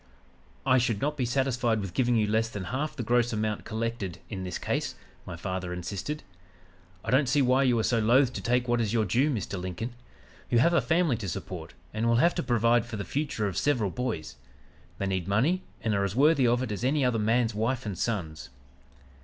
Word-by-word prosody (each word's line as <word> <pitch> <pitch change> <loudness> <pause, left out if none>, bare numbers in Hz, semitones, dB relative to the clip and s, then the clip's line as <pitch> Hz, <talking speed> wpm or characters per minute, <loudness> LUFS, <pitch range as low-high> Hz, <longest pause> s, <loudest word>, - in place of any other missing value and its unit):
"'I 130 -1 +5
should 115 -4 0
not 150 +4 -1
be 130 -4 -1
satisfied 125 -3 +1
with 95 -4 -5
giving 120 +1 +2
you 110 -2 +3
less 110 +2 +1
than 105 -4 -5
half 140 - -3
the 125 - -3
gross 120 +1 +2
amount 110 -1 -2
collected 110 -5 -3
in 95 -3 -4
this 90 -1 -4
case,' - - -2 0.3
my 90 - -5
father 90 +1 -4
insisted. 100 - -4 0.8
'I 115 - -2
don't 130 0 +3
see 145 0 +3
why 130 +1 +4
you 125 -3 +3
are 110 - +1
so 115 0 +2
loath 125 +4 +4
to - - -4
take 125 +1 +1
what 120 0 +2
is 110 -1 -1
your 110 -2 +2
due, 125 +10 +2
Mr. 100 -7 -3
Lincoln. 95 +7 -4 0.6
You 120 - +3
have 170 +9 +4
a 170 - +4
family 160 0 +2
to 100 -3 -4
support 80 -4 -6 0.2
and 110 +2 0
will 115 - +4
have 170 +9 +4
to 175 - -1
provide 120 -3 +3
for 115 -2 -5
the 100 - -4
future 140 -7 -2
of 95 - -4
several 120 -10 +1
boys. 80 - -4 0.6
They 100 - -2
need 95 -2 -1
money 135 - +2 0.2
and 110 - 0
are 100 -1 +1
as 100 +1 -2
worthy 140 -1 +4
of 120 +2 +2
it 120 - -4
as 105 +3 -4
any 135 +1 +2
other 120 -3 +1
man's 115 +2 +2
wife 115 +4 -1
and 100 -3 -3
sons.' 80 - -3
115 Hz, 220 wpm, -28 LUFS, 100-130 Hz, 0.8 s, I